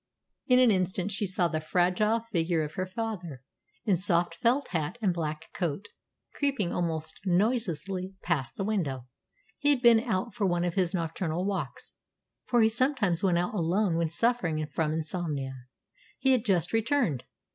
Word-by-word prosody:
In 250 - +5
an 250 -3 +6
instant 185 +1 0
she 205 0 -1
saw 185 -1 +1
the 155 -2 -2
fragile 185 +7 +2
figure 170 -7 0
of 150 - -5
her 185 -1 -3
father, 185 - -5 0.4
in 200 -5 +3
soft 175 -2 +2
felt 245 +10 +1
hat 165 +4 -2
and 200 -6 +1
black 155 -1 -4
coat, 175 +2 -3 0.4
creeping 270 -11 0
almost 160 -2 -2
noiselessly 190 - 0
past 150 -8 -1
the 195 - -3
window. 160 - -1 0.5
He 290 - +2
had 270 -3 +3
been 235 -2 +7
out 225 -1 -2
for 210 -5 0
one 175 -1 +1
of 175 -1 -1
his 185 -1 +1
nocturnal 165 +1 -2
walks, 200 -1 -4 0.5
for 240 -2 +4
he 220 - +5
sometimes 225 - +1
went 180 -3 +2
out 175 +3 -1
alone 180 0 +1
when 165 -1 +1
suffering 175 -6 0
from 155 0 -1
insomnia. 155 -4 -3 0.6
He 265 - +2
had 250 -3 +2
just 185 -4 +1
returned. 225 - +1
185 Hz, 165 wpm, -28 LUFS, 165-220 Hz, 0.6 s, been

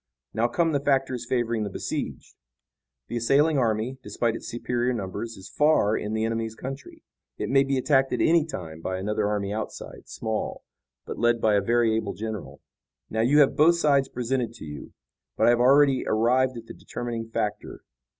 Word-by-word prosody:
Now 115 +1 +2
come 165 +7 +1
the 145 - +1
factors 135 -3 0
favoring 120 -3 0
the 105 - -2
besieged. - - -5 0.7
The 120 - -3
assailing 140 +6 +3
army, 115 +2 -1
despite 115 -2 -1
its - - -7
superior 120 +1 -1
numbers, 115 +2 -5
is 95 - -11
far 150 -8 +3
in 105 - -3
the 110 0 0
enemy's 115 0 -2
country. 135 +4 -8 0.3
It - - -3
may 135 0 +5
be 135 0 -1
attacked 135 0 +2
at - - -1
any 165 -1 +4
time 80 - -7
by 95 +2 -3
another 105 +2 -1
army 105 -1 -1
outside, 110 0 -7
small, 110 -1 -4 0.4
but - - -6
led 120 0 +3
by 110 -1 +2
a 100 - +3
very 115 +1 +2
able 110 -3 -2
general. 105 -11 -6 0.5
Now, 110 - 0
you 140 +6 +5
have 140 - +3
both 165 +3 +5
sides 140 -5 +2
presented 125 -1 -2
to 110 - -10
you, 75 -2 -9 0.5
but - - +3
I - - +6
have 120 - +2
already 135 +1 +5
arrived 125 +3 +2
at 115 - -9
the - - -10
determining 115 -2 -6
factor. 105 -2 -4
120 Hz, 185 wpm, -25 LUFS, 110-135 Hz, 0.7 s, I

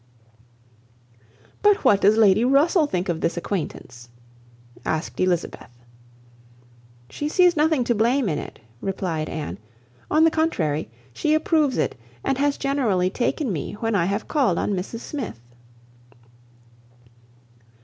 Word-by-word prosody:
"But 415 0 +3
what 200 - +5
does 210 +3 +4
Lady 215 0 +5
Russell 295 +5 +3
think 180 -8 -2
of 170 -2 -2
this 170 - -1
acquaintance?" 130 -10 -5 0.7
asked 160 +2 -3
Elizabeth. 180 -8 -1 1.4
"She 295 - -4
sees 355 +2 +4
nothing 305 -3 +2
to 240 - +1
blame 235 +3 +2
in 150 -5 -1
it," - - -9 0.2
replied 180 -5 -3
Anne; 125 - -5 0.5
"on 310 +1 +4
the 325 - +5
contrary, 160 - -1 0.2
she 305 - +1
approves 310 -3 +1
it, - - 0 0.3
and 270 - -1
has 285 0 +1
generally 225 -10 0
taken 245 +1 -1
me 155 - -4
when 225 +2 -2
I 185 -4 +2
have 200 +4 -2
called 260 - +1
on 205 - -1
Mrs 195 +5 -4
Smith." 265 - -6
220 Hz, 130 wpm, -23 LUFS, 180-290 Hz, 1.4 s, what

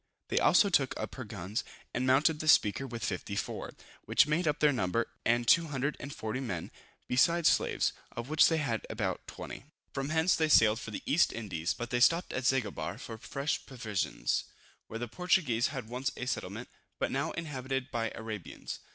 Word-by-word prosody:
They - - +2
also 200 - +5
took 135 -6 +2
up - - -4
her 130 - -6
guns, 105 +2 -4 0.3
and 130 +1 0
mounted 150 +4 +4
the 155 - -4
Speaker 115 -2 +4
with 115 -2 -4
54, 100 +1 -4 0.3
which - - +5
made 155 +3 0
up 150 - +1
their 150 -1 +4
number, 115 0 0 0.2
and 120 0 +2
240 140 -6 +1
men, 95 -11 -4 0.4
besides 165 +6 +4
slaves, - - +1 0.2
of 120 +1 -6
which 155 +1 +5
they 165 - +2
had 120 -8 -1
about - - -3
20. - - -8 0.3
From 135 0 -2
hence 160 +3 +3
they 160 -1 +1
sailed 110 -5 +6
for 115 - -7
the 105 - -6
East 170 +4 +3
Indies, 95 -7 -3
but 120 +1 -6
stopped 165 +7 +4
at 130 - -2
Zanguebar 105 -9 0
for 115 -3 -8
fresh 140 +5 -2
provisions, 110 -7 -2 0.4
where 115 - -6
the 120 +1 -4
Portuguese 130 -6 +2
had 130 -6 -5
once 125 +3 -2
a 130 - -3
settlement, 125 - -4 0.3
but - - -1
now - - 0
inhabited 135 -4 -3
by 115 -2 -1
Arabians. 110 -4 -6
130 Hz, 175 wpm, -31 LUFS, 110-150 Hz, 0.4 s, sailed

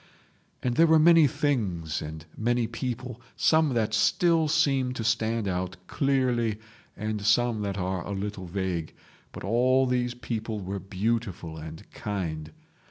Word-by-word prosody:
And 120 -1 0
there 165 - +6
were 160 0 +6
many 165 -1 +7
things 100 - -1
and 80 +1 -7
many 120 +1 +1
people, 125 +1 -5
some 155 -5 +3
that 110 -2 0
still 165 +7 +3
seem 140 -5 +2
to 120 - -4
stand 115 -1 0
out 90 0 -2
clearly 125 -5 +1 0.4
and 105 0 -3
some 110 +1 +3
that 100 -1 -2
are 90 -2 -2
a - - -8
little 100 -1 -4
vague, 90 -3 -3 0.4
but - - -9
all 125 +5 +3
these 125 -1 0
people 115 -3 -4
were 100 +1 -4
beautiful 95 -3 -2
and 80 0 -9
kind. 80 -7 -4
110 Hz, 145 wpm, -27 LUFS, 95-125 Hz, 0.4 s, many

